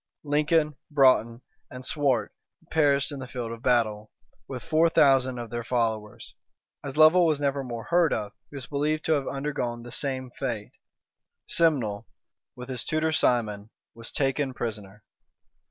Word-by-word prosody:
Lincoln, 150 Hz, 0 st, +1 dB
Broughton, 130 Hz, -5 st, +3 dB, 0.3 s
and 125 Hz, 0 st, -9 dB
Swart 135 Hz, -8 st, 0 dB, 0.4 s
perished 145 Hz, -3 st, +2 dB
in 140 Hz, -, -6 dB
the 130 Hz, -, -7 dB
field 120 Hz, -2 st, -5 dB
of 115 Hz, -1 st, -8 dB
battle, 110 Hz, -4 st, +1 dB, 0.4 s
with 130 Hz, -3 st, -6 dB
four 160 Hz, +1 st, +3 dB
thousand 135 Hz, -4 st, +4 dB
of 120 Hz, -2 st, -7 dB
their 120 Hz, 0 st, -3 dB
followers. 110 Hz, -3 st, -2 dB, 0.5 s
As 140 Hz, 0 st, -6 dB
Lovel 165 Hz, +3 st, +6 dB
was 155 Hz, -3 st, +1 dB
never 140 Hz, -1 st, 0 dB
more 120 Hz, -3 st, -6 dB
heard 170 Hz, -2 st, +2 dB
of, 105 Hz, -2 st, -2 dB, 0.2 s
he -, -, -13 dB
was 135 Hz, -2 st, -6 dB
believed 150 Hz, +3 st, -1 dB
to -, -, 0 dB
have 140 Hz, -3 st, -1 dB
undergone 135 Hz, -4 st, -3 dB
the 120 Hz, -, -10 dB
same 130 Hz, -1 st, -2 dB
fate; 120 Hz, -7 st, -4 dB, 0.8 s
Simnel, 130 Hz, -12 st, +1 dB, 0.5 s
with 125 Hz, 0 st, -9 dB
his 130 Hz, -2 st, -4 dB
tutor, 155 Hz, +1 st, 0 dB
Simon, 110 Hz, -8 st, 0 dB, 0.2 s
was 115 Hz, 0 st, -9 dB
taken 135 Hz, -1 st, -1 dB
prisoner. 105 Hz, -3 st, -6 dB
130 Hz, 155 wpm, -26 LUFS, 115-145 Hz, 0.8 s, Lovel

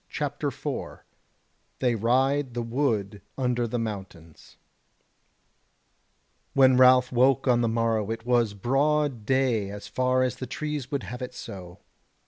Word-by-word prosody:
CHAPTER -, -, -3 dB
4 -, -, -6 dB, 0.7 s
They 125 Hz, -2 st, +1 dB
Ride 130 Hz, +4 st, +1 dB
the 120 Hz, -, -2 dB
Wood 115 Hz, -5 st, -1 dB, 0.2 s
Under 125 Hz, -2 st, 0 dB
the 120 Hz, -, -3 dB
Mountains 95 Hz, -8 st, -7 dB, 2.0 s
When 130 Hz, -1 st, +6 dB
Ralph 125 Hz, 0 st, +6 dB
woke 130 Hz, +2 st, +3 dB
on 120 Hz, -1 st, +4 dB
the 115 Hz, -, +1 dB
morrow 115 Hz, -2 st, 0 dB
it 115 Hz, 0 st, -5 dB
was 120 Hz, -4 st, +2 dB
broad 135 Hz, +1 st, 0 dB
day 130 Hz, -6 st, +1 dB
as 105 Hz, 0 st, -8 dB
far 130 Hz, 0 st, +1 dB
as 125 Hz, -3 st, -2 dB
the 130 Hz, -, -6 dB
trees 150 Hz, 0 st, -4 dB
would 140 Hz, -2 st, -3 dB
have 125 Hz, +1 st, -7 dB
it 125 Hz, 0 st, -6 dB
so. 90 Hz, -2 st, -9 dB
125 Hz, 135 wpm, -26 LUFS, 110-130 Hz, 2.0 s, When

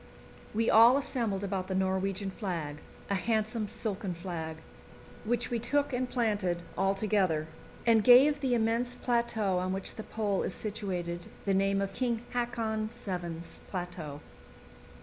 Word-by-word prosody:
We 225 Hz, +2 st, 0 dB
all 230 Hz, +4 st, +8 dB
assembled 230 Hz, -8 st, -1 dB
about 190 Hz, -2 st, -2 dB
the 190 Hz, -, -2 dB
Norwegian 190 Hz, +1 st, 0 dB
flag 165 Hz, -7 st, -4 dB, 0.3 s
a -, -, -1 dB
handsome 220 Hz, +2 st, 0 dB
silken 200 Hz, -3 st, -3 dB
flag 165 Hz, -2 st, -5 dB, 0.7 s
which 240 Hz, +2 st, 0 dB
we 235 Hz, -, 0 dB
took 280 Hz, +4 st, 0 dB
and 250 Hz, 0 st, -1 dB
planted 205 Hz, -8 st, 0 dB
all 195 Hz, +1 st, +2 dB
together, 190 Hz, -7 st, +1 dB, 0.4 s
and 225 Hz, -2 st, +5 dB
gave 270 Hz, +5 st, +7 dB
the 260 Hz, -3 st, +1 dB
immense 235 Hz, +2 st, +1 dB
plateau 235 Hz, -7 st, +1 dB
on 185 Hz, +1 st, -1 dB
which 195 Hz, 0 st, -2 dB
the 220 Hz, -, -5 dB
Pole 210 Hz, -3 st, -1 dB
is 185 Hz, -, -2 dB
situated 180 Hz, -5 st, -3 dB, 0.2 s
the 200 Hz, -, +2 dB
name 195 Hz, +1 st, +2 dB
of 195 Hz, 0 st, -4 dB
"King 240 Hz, -1 st, -1 dB
Haakon 230 Hz, -3 st, -1 dB
VII.'s 180 Hz, -8 st, -6 dB
Plateau." 175 Hz, -6 st, -5 dB
205 Hz, 145 wpm, -30 LUFS, 185-235 Hz, 0.7 s, all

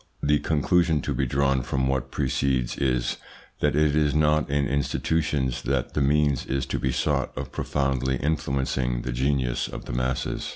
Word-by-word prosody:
The 75 Hz, 0 st, +3 dB
conclusion 80 Hz, +1 st, +2 dB
to -, -, -2 dB
be 65 Hz, -, 0 dB
drawn 70 Hz, +1 st, +1 dB
from 65 Hz, +1 st, -1 dB
what 65 Hz, 0 st, -1 dB
precedes 65 Hz, -3 st, 0 dB
is, 65 Hz, -3 st, 0 dB, 0.4 s
that -, -, +1 dB
it 75 Hz, -1 st, +3 dB
is 75 Hz, -1 st, +2 dB
not 75 Hz, 0 st, +2 dB
in 70 Hz, -1 st, +1 dB
institutions 70 Hz, -1 st, 0 dB
that 65 Hz, -2 st, -1 dB
the 75 Hz, -, 0 dB
means 70 Hz, -1 st, +2 dB
is 70 Hz, 0 st, -1 dB
to -, -, 0 dB
be 65 Hz, -, 0 dB
sought -, -, 0 dB
of -, -, -5 dB
profoundly 65 Hz, -2 st, -1 dB
influencing 65 Hz, -3 st, -1 dB
the 65 Hz, -, -3 dB
genius 65 Hz, -1 st, 0 dB
of -, -, -8 dB
the -, -, -5 dB
masses. 65 Hz, +1 st, -2 dB
70 Hz, 170 wpm, -25 LUFS, 65-75 Hz, 0.4 s, The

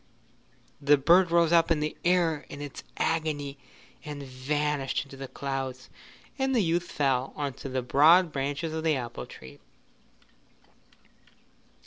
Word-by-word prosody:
The 145 Hz, +1 st, +5 dB
bird 170 Hz, +6 st, +5 dB
rose 170 Hz, -1 st, +3 dB
up 165 Hz, 0 st, +4 dB
in 165 Hz, -2 st, +2 dB
the 150 Hz, 0 st, -2 dB
air 170 Hz, -5 st, +1 dB
in 140 Hz, -, -8 dB
its 145 Hz, -2 st, -7 dB
agony 145 Hz, -4 st, -1 dB, 0.4 s
and 145 Hz, -1 st, -7 dB
vanished 140 Hz, +2 st, -1 dB
into 135 Hz, -, -12 dB
the 135 Hz, 0 st, -7 dB
clouds, 135 Hz, -1 st, -5 dB, 0.5 s
and 265 Hz, 0 st, +1 dB
the 225 Hz, -, +3 dB
youth 170 Hz, +1 st, 0 dB
fell 135 Hz, -3 st, 0 dB
on 145 Hz, -2 st, -3 dB
to 135 Hz, -, -5 dB
the 130 Hz, -1 st, -2 dB
broad 160 Hz, +7 st, +5 dB
branches 145 Hz, +3 st, -3 dB
of 160 Hz, 0 st, -3 dB
the 160 Hz, -2 st, +2 dB
apple 120 Hz, -3 st, -5 dB
tree. 65 Hz, -, -13 dB
145 Hz, 140 wpm, -28 LUFS, 135-165 Hz, 0.5 s, The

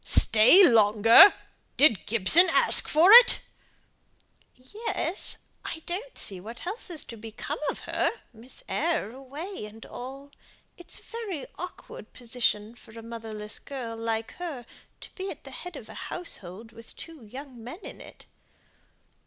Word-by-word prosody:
"Stay 225 Hz, -, +5 dB
longer! 225 Hz, -, +7 dB, 0.5 s
Did 265 Hz, -, +5 dB
Gibson 235 Hz, -, +4 dB
ask -, -, +3 dB
for 330 Hz, +6 st, +5 dB
it?" 480 Hz, +2 st, +9 dB, 1.2 s
"Yes! 380 Hz, -, -3 dB, 0.3 s
I 320 Hz, -, -6 dB
don't 410 Hz, +9 st, -6 dB
see 190 Hz, -2 st, -2 dB
what 225 Hz, -, -10 dB
else 405 Hz, +3 st, -6 dB
is 325 Hz, -4 st, -6 dB
to 235 Hz, -, -10 dB
become 225 Hz, +6 st, -7 dB
of -, -, -5 dB
her; -, -, -1 dB, 0.2 s
Miss 240 Hz, +3 st, -10 dB
Eyre 315 Hz, -9 st, -1 dB
away 280 Hz, -, -8 dB
and 220 Hz, +1 st, -13 dB
all. 270 Hz, +3 st, -10 dB, 0.4 s
It's 350 Hz, -, -7 dB
a -, -, -14 dB
very 420 Hz, -, -6 dB
awkward 360 Hz, +2 st, -10 dB
position 230 Hz, -3 st, -1 dB
for 230 Hz, -1 st, -16 dB
a 225 Hz, -, -9 dB
motherless 225 Hz, -2 st, -6 dB
girl 250 Hz, -5 st, -7 dB
like 225 Hz, 0 st, -3 dB
her 290 Hz, -9 st, -6 dB, 0.4 s
to -, -, -11 dB
be 380 Hz, 0 st, -6 dB
at -, -, -9 dB
the -, -, -11 dB
head 360 Hz, -, -9 dB
of -, -, -10 dB
a -, -, -11 dB, 0.2 s
household 220 Hz, -, -7 dB
with 230 Hz, 0 st, -14 dB
two 325 Hz, -6 st, -11 dB
young 255 Hz, +1 st, -11 dB
men 255 Hz, -, -9 dB
in -, -, -10 dB
it." -, -, -14 dB
255 Hz, 150 wpm, -26 LUFS, 225-345 Hz, 1.2 s, it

